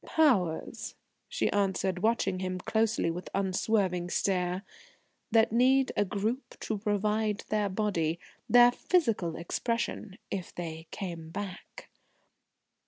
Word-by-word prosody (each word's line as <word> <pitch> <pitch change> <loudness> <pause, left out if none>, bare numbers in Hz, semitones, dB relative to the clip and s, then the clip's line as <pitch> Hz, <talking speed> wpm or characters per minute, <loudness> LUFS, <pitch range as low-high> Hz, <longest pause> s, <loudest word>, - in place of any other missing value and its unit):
"Powers," 215 - +1 0.3
she - - 0
answered, 190 -2 0
watching 215 -4 +1
him 185 0 -2
closely 220 -1 +1
with 175 +2 -6
unswerving 190 -2 +1
stare, 180 0 0 0.7
"that 225 -1 +4
need 260 +3 +4
a - - +3
group 225 +7 -3
to 215 -2 -2
provide 210 0 0
their 210 -1 +1
body 180 -5 0 0.3
their 245 0 +8
physical 230 - +1
expression 210 +3 -3
if 185 -3 -4
they 160 -1 -6
came 170 -4 -6
back." 200 - -7
200 Hz, 110 wpm, -30 LUFS, 180-225 Hz, 0.7 s, their